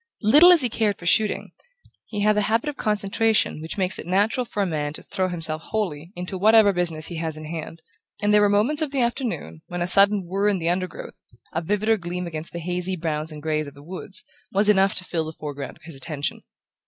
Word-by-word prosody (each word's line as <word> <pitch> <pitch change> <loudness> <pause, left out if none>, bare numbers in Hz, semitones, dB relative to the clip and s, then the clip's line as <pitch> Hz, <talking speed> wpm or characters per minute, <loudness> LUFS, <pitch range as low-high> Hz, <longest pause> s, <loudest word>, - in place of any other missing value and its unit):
Little 295 +12 +8
as 340 -6 +6
he - - +3
cared 215 -3 0
for 170 - -12
shooting, 210 +4 +2 0.6
he 210 -2 -4
had 210 +1 +3
the 210 - +2
habit 225 +7 0
of 295 - -6
concentration 215 - +1
which 160 +5 -5
makes 185 -1 +1
it - - -8
natural 205 +7 +1
for 205 - -1
a - - 0
man 150 -4 -2
to - - -8
throw 185 -1 -2
himself 160 -3 -2
wholly 175 -7 -3
into 180 +1 -5
whatever 215 0 +6
business 165 -3 -1
he 170 - -5
has 160 -1 -3
in 155 - -8
hand, 160 0 -7 0.4
and 210 0 +1
there 210 - +6
were 205 - +4
moments 225 +10 +2
of 310 - 0
the 275 -2 -1
afternoon 220 - -3
when 175 - -5
a - - 0
sudden 200 +1 +6
whirr 195 +4 0
in 200 - +1
the 165 -1 -1
undergrowth, 185 +1 -5 0.3
a 165 - -1
vivider 210 +5 +1
gleam 180 +1 -4
against 160 -1 -6
the - - -6
hazy 180 +2 -1
browns 160 -2 -3
and 150 -1 -10
greys 155 -1 -1
of 140 - -11
the 140 - -14
woods, 185 +3 -5 0.3
was 205 +2 +3
enough 195 -1 +4
to 185 - 0
fill 165 -3 -2
the 160 - -7
foreground 145 -3 -6
of - - -27
his 165 0 -8
attention. 145 +1 -4
185 Hz, 230 wpm, -23 LUFS, 160-210 Hz, 0.6 s, Little